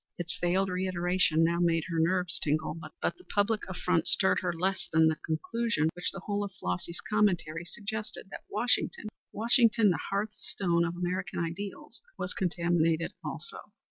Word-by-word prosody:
Its 175 -1 -3
veiled 185 +2 +2
reiteration 180 -3 +2
now 170 +1 +2
made 165 -2 +2
her 165 -2 -1
nerves 180 +1 +2
tingle, 155 +1 0 0.3
but - - 0
the - - -15
personal 210 +2 +1
affront 180 -2 0
stirred 190 - +5
her 180 -1 -1
less 185 +3 -1
than 160 0 +5
the 160 - +2
conclusion, 160 0 0
which 175 - -1
the 195 - -8
whole 205 +1 -1
of 200 - -4
Flossy's 90 - -3
commentary 180 -6 +1
suggested, 210 +2 -5
that - - -8
Washington 225 -1 0 0.2
Washington 230 -1 +4
the 160 - -1
hearth 205 +2 -1
stone 170 -5 0
of 170 0 -3
American 180 +1 -2
ideals, 195 - -5 0.2
was 180 - -3
contaminated 170 -2 +1
also. 460 - -4
180 Hz, 160 wpm, -30 LUFS, 170-205 Hz, 0.3 s, stirred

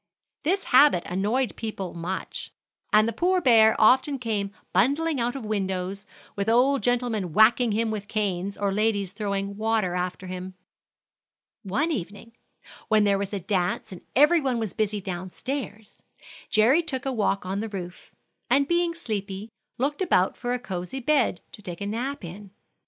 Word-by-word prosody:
This 380 +6 0
habit 260 -9 +6
annoyed 210 +6 -1
people 205 -5 -5
much, 175 +3 -5 0.4
and 215 +1 +5
the 230 - -2
poor 365 - +2
bear 225 -7 +5
often 260 +5 +4
came 215 -5 -2 0.2
bundling 285 - +2
out 240 +2 -1
of 265 -5 -6
windows, 195 -1 -3 0.3
with 200 +2 -1
old 255 +4 +4
gentlemen 235 -8 0
whacking 225 +3 +5
him 220 +1 0
with 205 -2 -5
canes, 200 -3 -2
or 200 -1 0
ladies 205 -2 0
throwing 200 -1 -3
water 220 -4 0
after 180 +1 -3
him. 185 0 -6 1.1
One 265 - -1
evening, 205 - -5 0.6
when 215 -1 +4
there 200 -1 +2
was 200 -1 -3
a 200 - -2
dance 185 0 -1
and 185 - -9
every 300 +5 +5
one 260 -3 0
was 220 -4 -3
busy 210 -1 -1
down 185 -1 -5
stairs, 220 -2 -6 0.5
Jerry 240 +10 +4
took 280 -5 -4
a 270 - 0
walk 200 -4 0
on 190 +2 -2
the 220 +1 -3
roof, 180 -3 -8 0.4
and 275 +3 +3
being 345 0 +1
sleepy, 205 - -5 0.3
looked 285 +7 -1
about 190 - +2
for 245 0 -3
a - - 0
cosey 190 +1 -5
bed 265 -7 +1
to - - -12
take 175 -4 -7
a 200 - -4
nap 235 +2 -3
in. 195 +4 -9
215 Hz, 165 wpm, -25 LUFS, 195-250 Hz, 1.1 s, habit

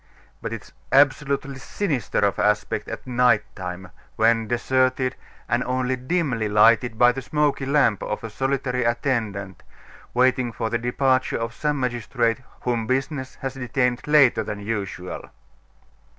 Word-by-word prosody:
But - - -4
it - - -5
is - - -18 0.2
absolutely 140 0 +2
sinister 140 - -2
of 100 -1 +1
aspect 105 0 0
at - - -7
night 125 -4 +3
time, 90 -1 -7 0.2
when 115 0 +3
deserted, 130 +2 +1 0.3
and 120 +2 +1
only 130 0 0
dimly 130 -5 -1
lighted 110 +2 +4
by 120 +1 +6
the 135 +2 -5
smoky 145 0 0
lamp 135 -8 +3
of 105 - -4
a 115 - -6
solitary 130 0 -1
attendant, 110 -6 -1 0.5
waiting 130 -1 +2
for 115 -1 -3
the 115 - 0
departure 130 +2 +1
of 115 +1 -4
some 150 +2 -1
magistrate 120 -1 -1 0.2
whom 120 -3 -1
business 130 +1 -2
has 135 -1 -2
detained 125 -1 -1
later 145 -7 +5
than 105 -1 -5
usual. 100 -4 -5
125 Hz, 140 wpm, -23 LUFS, 115-135 Hz, 0.5 s, by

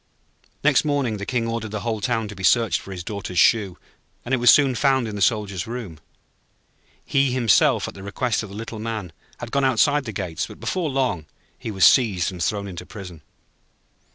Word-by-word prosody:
Next 145 -2 +4
morning 140 -7 0
the 100 - -6
King 120 -3 0
ordered 115 -1 -3
the 105 0 -4
whole 110 -2 -2
town 115 -1 -1
to 105 - -9
be 95 - -9
searched 115 -2 +3
for 100 - -11
his 90 -2 -6
Daughter's 100 -2 -6
shoe, 100 0 +3 0.5
and 125 - -3
it - - +4
was 120 0 +4
soon 140 -3 +6
found 130 -1 +2
in 105 - -5
the 100 - -5
Soldier's 100 -3 0
room. 110 -10 -6 1.1
He 135 -1 +2
himself, 120 -5 +3
at - - -7
the 95 - -11
request 105 +3 -1
of 105 - -8
the 100 - -10
Little 110 0 -6
Man, 110 -6 -5 0.2
had 115 - -8
gone 140 0 +1
outside 135 +3 +3
the 110 - -4
gates; 90 -5 -4
but - - -12
before 180 -4 -2
long 130 - -1 0.3
he - - -7
was 95 -3 +3
seized 100 -8 +4
and 90 -2 -8
thrown 100 +3 -1
into 90 -2 -7
prison. 90 -5 -10
110 Hz, 205 wpm, -23 LUFS, 95-125 Hz, 1.1 s, soon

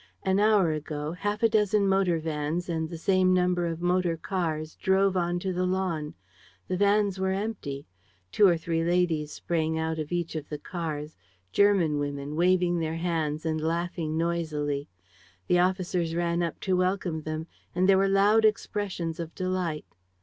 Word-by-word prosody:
An 190 +1 +2
hour 205 -5 +4
ago, 150 0 -4
half 205 +5 -3
a - - +7
dozen 210 -2 +2
motor 190 -3 +2
vans 160 +2 -2
and 160 -1 -2
the 170 - -6
same 185 +1 +3
number 180 -1 +1
of 165 +1 -4
motor 175 -1 +1
cars 160 -4 -3
drove 190 0 +2
onto 175 +1 -1
the 180 +1 0
lawn. 180 -5 -2 0.5
The 185 - -1
vans 200 0 +2
were 190 0 +1
empty. 190 -9 -4 0.5
Two 205 - +5
or 175 -2 +4
three 165 0 -1
ladies 170 -3 +1
sprang 160 -2 -1
out 160 0 -2
of 155 +1 -4
each 175 -1 -2
of 150 -2 -5
the 150 - -4
cars, 155 -2 -5 0.3
German 185 -7 +3
women, 145 0 -4
waving 175 0 +2
their 160 0 -2
hands 160 -3 -2
and 155 -1 -1
laughing 165 -1 -2
noisily. 155 -4 -1 0.6
The 175 - +3
officers 180 -2 0
ran 170 0 0
up 170 -1 -2
to 190 -1 +1
welcome 180 -3 0
them; 155 +1 -4 0.3
and 185 +1 +3
there 195 -1 +5
were 195 0 +3
loud 205 +3 +4
expressions 200 -5 -1
of 170 -1 -6
delight. 185 -4 -2
175 Hz, 165 wpm, -27 LUFS, 160-190 Hz, 0.6 s, a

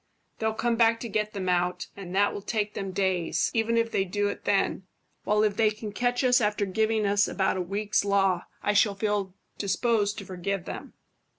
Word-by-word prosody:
They'll 220 0 0
come 235 +1 0
back 230 0 +4
to 235 - -4
get 215 0 -2
them 190 -3 -4
out, 180 0 0
and 190 -2 -7
that 205 +1 +3
will 205 - -5
take 210 0 -2
them 195 - -4
days, 185 -3 0
even 230 0 +1
if 230 0 +1
they 195 - +1
do 205 +2 -1
it - - -7
then; 195 -2 +1 0.4
while 210 0 +3
if 210 -2 +1
they 220 -1 +4
can 215 0 -6
catch 245 +4 0
us 250 -1 +4
after 210 -1 +1
giving 220 +2 +1
us 200 0 +3
about 190 -1 0
a - - -1
week's 200 +4 0
law, 195 -3 +2 0.2
I 205 - +2
shall 205 0 +3
feel 200 -2 -1 0.2
disposed 205 +1 +1
to 200 - -6
forgive 185 0 -3
them." - - -7
205 Hz, 205 wpm, -27 LUFS, 195-220 Hz, 0.4 s, back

